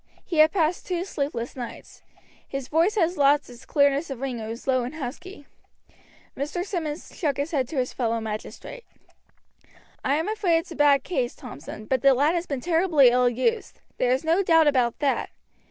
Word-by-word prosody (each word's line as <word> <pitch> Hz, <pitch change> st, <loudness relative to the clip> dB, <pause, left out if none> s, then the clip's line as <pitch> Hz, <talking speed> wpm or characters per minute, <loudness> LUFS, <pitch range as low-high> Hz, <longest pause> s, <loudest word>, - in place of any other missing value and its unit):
He 340 Hz, -, -4 dB
had 310 Hz, +1 st, +7 dB
passed 340 Hz, -2 st, 0 dB
two 360 Hz, -1 st, -2 dB
sleepless 280 Hz, -9 st, -4 dB
nights; 245 Hz, -3 st, -9 dB, 0.5 s
his 275 Hz, -2 st, -5 dB
voice 335 Hz, +8 st, +2 dB
had 350 Hz, -3 st, +1 dB
lost 285 Hz, -1 st, +3 dB
its 245 Hz, +2 st, -14 dB
clearness 285 Hz, +2 st, +2 dB
of 270 Hz, -3 st, -5 dB
ring 260 Hz, -3 st, -3 dB
and 220 Hz, 0 st, -6 dB
was 230 Hz, +2 st, -7 dB
low 255 Hz, -2 st, +2 dB
and 255 Hz, +5 st, -6 dB
husky. 305 Hz, +4 st, -7 dB, 0.9 s
Mr. 300 Hz, +6 st, -3 dB
Simmonds 335 Hz, -6 st, -5 dB
shook 290 Hz, -6 st, -1 dB
his 285 Hz, +3 st, -2 dB
head 270 Hz, -6 st, 0 dB
to 300 Hz, -, -8 dB
his 250 Hz, -1 st, -1 dB
fellow 230 Hz, -2 st, -1 dB
magistrate. 220 Hz, -, -7 dB, 1.2 s
"I 275 Hz, -, +2 dB
am 320 Hz, +4 st, -1 dB
afraid 415 Hz, -6 st, +1 dB
it's 330 Hz, -, -5 dB
a -, -, -7 dB
bad 285 Hz, -2 st, +4 dB
case, 255 Hz, -9 st, -2 dB
Thompson, 160 Hz, +10 st, -9 dB
but 260 Hz, +1 st, 0 dB
the 275 Hz, 0 st, +5 dB
lad 290 Hz, +5 st, +3 dB
has 345 Hz, 0 st, -2 dB
been 275 Hz, -3 st, -3 dB
terribly 325 Hz, -5 st, +4 dB
ill 250 Hz, 0 st, +3 dB
used, 415 Hz, -, -1 dB, 0.2 s
there 250 Hz, -, +2 dB
is 260 Hz, +3 st, +1 dB
no 330 Hz, +4 st, +2 dB
doubt 325 Hz, -4 st, +4 dB
about 255 Hz, -5 st, +2 dB
that. 280 Hz, -2 st, 0 dB
285 Hz, 190 wpm, -25 LUFS, 255-330 Hz, 1.2 s, had